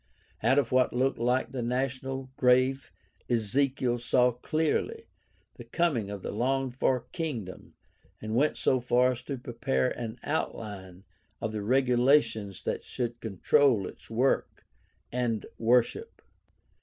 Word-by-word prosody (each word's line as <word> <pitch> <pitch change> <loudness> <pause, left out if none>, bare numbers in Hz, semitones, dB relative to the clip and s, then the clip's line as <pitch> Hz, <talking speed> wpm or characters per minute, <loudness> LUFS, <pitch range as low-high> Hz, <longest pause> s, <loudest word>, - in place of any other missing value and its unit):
Out 130 - +3
of 135 -5 +2
what 130 0 +3
looked 130 +1 +1
like 125 +2 +1
the 130 -2 -3
national 130 +2 -3
grave 130 +2 +2 0.4
Ezekiel 120 +2 +1
saw 125 +1 +3
clearly 160 - -1 0.5
the - - -8
coming 145 - 0
of 100 -2 -6
the - - -3
longed 130 +3 0
for 130 -1 +1
kingdom 125 - -5 0.4
and 110 0 -5
went 140 +6 +2
so 130 - +2
far 125 +1 +3
as 125 -1 -6
to 135 +1 -5
prepare 125 +1 -1
an 115 -1 -5
outline 100 - -4 0.4
of 110 - -3
the 105 -1 -3
regulations 120 -3 +2
that - - -2
should 120 -1 -4
control 110 +2 +2
its - - -11
work 125 +4 0 0.5
and 120 -3 -1
worship. 125 - +1
125 Hz, 130 wpm, -28 LUFS, 115-135 Hz, 0.5 s, Out